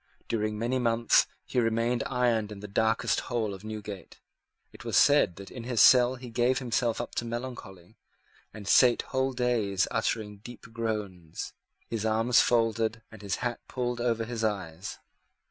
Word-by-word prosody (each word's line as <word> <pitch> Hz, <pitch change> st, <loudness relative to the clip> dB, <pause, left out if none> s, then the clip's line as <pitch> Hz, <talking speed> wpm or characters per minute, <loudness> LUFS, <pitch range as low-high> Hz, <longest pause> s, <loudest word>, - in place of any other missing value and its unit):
During 110 Hz, -1 st, -1 dB
many 120 Hz, +4 st, 0 dB
months 115 Hz, -1 st, +3 dB, 0.2 s
he -, -, -1 dB
remained 115 Hz, +1 st, +1 dB
ironed 120 Hz, -5 st, +1 dB
in 105 Hz, -, -8 dB
the 105 Hz, -, -8 dB
darkest 110 Hz, +3 st, +1 dB
hole 115 Hz, -4 st, -2 dB
of 95 Hz, +1 st, -10 dB
Newgate. 105 Hz, -3 st, -8 dB, 0.5 s
It -, -, -12 dB
was -, -, 0 dB
said 145 Hz, -, +5 dB
that 100 Hz, +1 st, -11 dB
in 120 Hz, -, -7 dB
his 120 Hz, -1 st, -2 dB
cell 125 Hz, +3 st, +7 dB
he 125 Hz, -1 st, -10 dB
gave 120 Hz, +3 st, +2 dB
himself 120 Hz, -2 st, 0 dB
up 120 Hz, -, -5 dB
to -, -, 0 dB
melancholy, 115 Hz, -7 st, -7 dB, 0.5 s
and 105 Hz, -2 st, -10 dB
sate 120 Hz, +3 st, +5 dB
whole 130 Hz, 0 st, -1 dB
days 115 Hz, -6 st, +1 dB
uttering 105 Hz, -2 st, -2 dB
deep 120 Hz, +4 st, -12 dB
groans, 105 Hz, -8 st, -4 dB, 0.3 s
his 115 Hz, -2 st, -3 dB
arms 115 Hz, +2 st, +3 dB
folded, 115 Hz, -1 st, +1 dB
and 110 Hz, -2 st, -12 dB
his 100 Hz, -1 st, -2 dB
hat 120 Hz, -1 st, -2 dB
pulled 120 Hz, -1 st, -3 dB
over 115 Hz, -2 st, 0 dB
his 115 Hz, -1 st, -4 dB
eyes. 95 Hz, -5 st, -3 dB
115 Hz, 165 wpm, -28 LUFS, 105-120 Hz, 0.5 s, cell